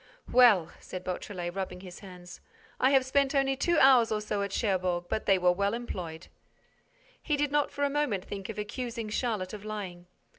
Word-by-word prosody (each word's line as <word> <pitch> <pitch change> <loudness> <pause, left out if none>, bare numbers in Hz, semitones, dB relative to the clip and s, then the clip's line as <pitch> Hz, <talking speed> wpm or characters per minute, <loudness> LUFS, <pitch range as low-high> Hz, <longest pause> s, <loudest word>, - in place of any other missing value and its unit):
"Well," 220 -10 +6
said 185 -1 -8
Beautrelet, 180 -1 -4
rubbing 190 -1 -5
his 180 -2 -10
hands, 180 -3 -12 0.4
"I 260 - +4
have 270 -2 +4
spent 275 +2 +1
only 270 -1 +2
two 345 +5 +1
hours 255 -5 +6
or 215 - +1
so 210 -1 -2
at 200 -1 -2
Cherbourg, 185 -5 0
but 220 - -2
they 195 - +5
were 180 -1 +4
well 200 +4 0
employed." 175 -9 -6 1.0
He 300 -2 0
did 290 0 0
not 295 -1 +2
for 285 - -4
a - - +4
moment 275 -11 -1
think 195 0 -6
of 225 - -6
accusing 230 +1 -4
Charlotte 210 -4 -2
of 205 -1 -7
lying. 190 -5 -6
210 Hz, 190 wpm, -29 LUFS, 185-255 Hz, 1.0 s, Well